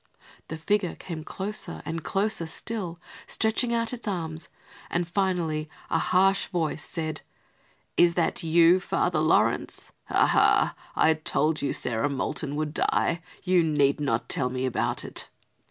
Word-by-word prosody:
The 160 - -5
figure 190 +2 0
came 165 -4 -7
closer, 205 +6 -4
and 165 -1 -4
closer 195 -4 -1
still, 180 -1 -4 0.3
stretching 225 +2 +1
out 230 0 0
its 240 -2 -6
arms, 165 -5 -3 0.4
and 175 0 -1
finally 175 -5 -1 0.2
a 165 - +3
harsh 195 +3 +3
voice 165 -4 -2
said: 155 -2 -4 0.8
"Is 170 -1 +5
that 170 0 +1
you, 170 +2 +5
Father - - 0
Laurence? - - +1
Ha! - - +3
Ha! - - +3 0.2
I 160 - +4
told 155 0 0
you 140 - 0
Sarah 120 +3 -1
Moulton 140 +1 -2
would 150 0 -2
die. 165 0 +1 0.2
You 180 -2 +3
need 145 -2 +2
not 130 -5 -1
tell 125 -2 +1
me 130 +1 -2
about 130 - -1
it." - - -5
165 Hz, 145 wpm, -26 LUFS, 155-185 Hz, 0.8 s, Is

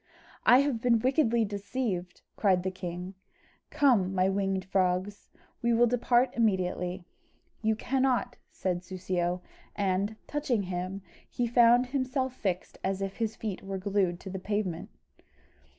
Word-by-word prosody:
"I 250 +2 +8
have 275 -5 -1
been 240 -1 +4
wickedly 235 -2 +2
deceived!" 200 -3 -3
cried 185 -4 +2
the 190 - -1
king; 180 0 -6 0.6
"come, 240 -11 +3
my 185 0 +3
winged 195 -1 -1
frogs, 190 +1 0 0.3
we 235 0 +2
will 235 +1 +5
depart 245 +1 +2
immediately." 185 -5 0 0.6
"You 220 0 +2
cannot," 250 0 0 0.2
said 180 -2 -2
Soussio; 180 -1 -2 0.3
and, 200 +1 0
touching 275 -8 -1
him, 185 +1 -4 0.3
he 245 - -1
found 240 +1 +5
himself 260 0 -1
fixed 185 -7 -3
as 195 0 -1
if 195 0 -5
his 225 -1 -1
feet 210 -5 -4
were 195 0 -4
glued 190 -2 0
to 190 - -7
the 190 - -4
pavement. 195 -3 -2
200 Hz, 135 wpm, -29 LUFS, 185-240 Hz, 0.6 s, I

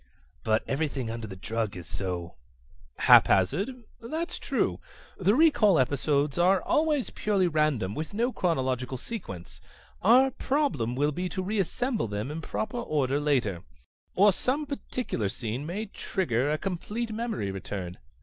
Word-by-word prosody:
"But 110 0 +2
everything 135 -4 -1
under 115 -1 -5
the 95 - -8
drug 110 0 -3
is 85 - -8
so 90 -3 -4 0.3
..." 60 0 -29
"Haphazard? 200 - +5 0.2
That's 315 +9 -4
true. - - 0 0.4
The 200 +3 +3
recall 245 - +5
episodes 140 +3 +1
are 185 +2 +5
always 300 - +1
purely 200 -4 +1
random, 150 - +1
with 155 +4 -4
no 240 +4 +1
chronological 130 - -1
sequence. 120 - -7 0.4
Our 255 +6 +6
problem 260 - 0
will 145 +3 +2
be 180 +5 -3
to 185 +1 -3
reassemble 215 - -1
them 105 +6 -3
in 160 +2 -5
proper 220 +8 -3
order 145 - 0
later. 125 - +1 0.5
Or 200 +1 +6
some 275 +9 -1
particular 250 - -3
scene 120 +7 -4
may 200 +6 -3
trigger 145 - -1
a 155 - +1
complete 205 +6 -3
memory 220 - -2
return. 95 -2 -6
155 Hz, 140 wpm, -28 LUFS, -, 0.5 s, Our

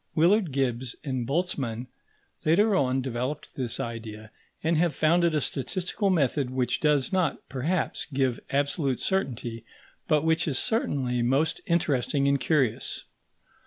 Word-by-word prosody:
Willard 180 +2 +4
Gibbs 130 -2 -1
and 130 -5 -2
Boltzmann 135 -7 -1 0.6
later 200 +7 +4
on 130 -3 +1
developed 130 +4 -4
this 125 -4 -3
idea, 110 -2 -6 0.3
and 165 +1 +2
have 165 0 +2
founded 170 +1 +3
a 150 - +2
statistical 185 - -1
method 145 -6 +1
which 130 -1 0
does 150 +2 +2
not, 180 -5 0
perhaps, 155 +7 -1
give 130 -3 +1
absolute 140 -1 0
certainty, 120 - -2 0.4
but 155 -2 +3
which 160 +2 +2
is 140 -4 0
certainly 130 - 0
most 135 +6 +1
interesting 145 -4 +1
and 140 0 +3
curious. 130 -9 0
140 Hz, 130 wpm, -27 LUFS, 125-165 Hz, 0.6 s, Willard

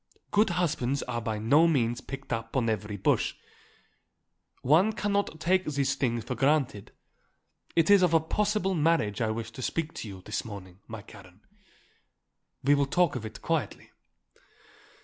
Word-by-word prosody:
Good 210 0 +3
husbands 155 -7 0
are 120 -1 -3
by 110 -1 -3
no 140 +10 +4
means 120 -7 +1
picked 135 -1 -6
up 115 +2 -3
on 115 -3 +2
every 105 -1 -4
bush. - - +1 1.3
One 170 +11 +4
cannot 200 -6 -1
take 185 +2 +2
these 140 -2 0
things 120 -4 -1
for 125 - -4
granted. 135 -3 0 0.8
It 165 +3 +4
is 200 -2 +7
of 175 -2 +3
a - - +7
possible 200 +3 0
marriage 155 - +1
I 110 - +1
wish 110 +1 -4
to 130 - -9
speak 165 +4 -2
to - - -6
you 95 -2 -10
this - - -3
morning, 95 -4 -10
my 110 -2 -8
Karen. 100 -3 -15 1.2
We 140 +2 +4
will 140 -1 +2
talk 175 +1 +2
of 110 -3 -4
it - - -12
quietly." - - -2
135 Hz, 160 wpm, -28 LUFS, 110-165 Hz, 1.3 s, is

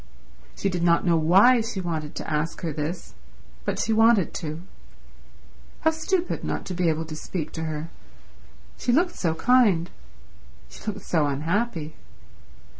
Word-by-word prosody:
She - - -1
did 180 -3 -1
not 170 0 +3
know 170 -2 +4
why 195 +10 +5
she 220 -3 -4
wanted 160 -4 -4
to - - -5
ask 155 +1 -2
her 165 -4 -2
this, 160 +4 -5 0.5
but - - -1
she 225 - 0
wanted 225 -4 +4
to. 160 0 -5 1.2
How 320 - +4
stupid 340 +3 -1
not - - -3
to 185 - -5
be 175 -1 +1
able 160 +1 -1
to 155 -1 -7
speak 155 0 -5
to 160 0 -4
her. 155 +1 -4 0.9
She 245 - +1
looked 345 +8 +2
so 165 -3 -1
kind. 205 -5 +3 0.8
She - - -13
looked 205 -1 -3
so 155 -4 +2
unhappy. 160 - -1
170 Hz, 155 wpm, -25 LUFS, 160-220 Hz, 1.2 s, why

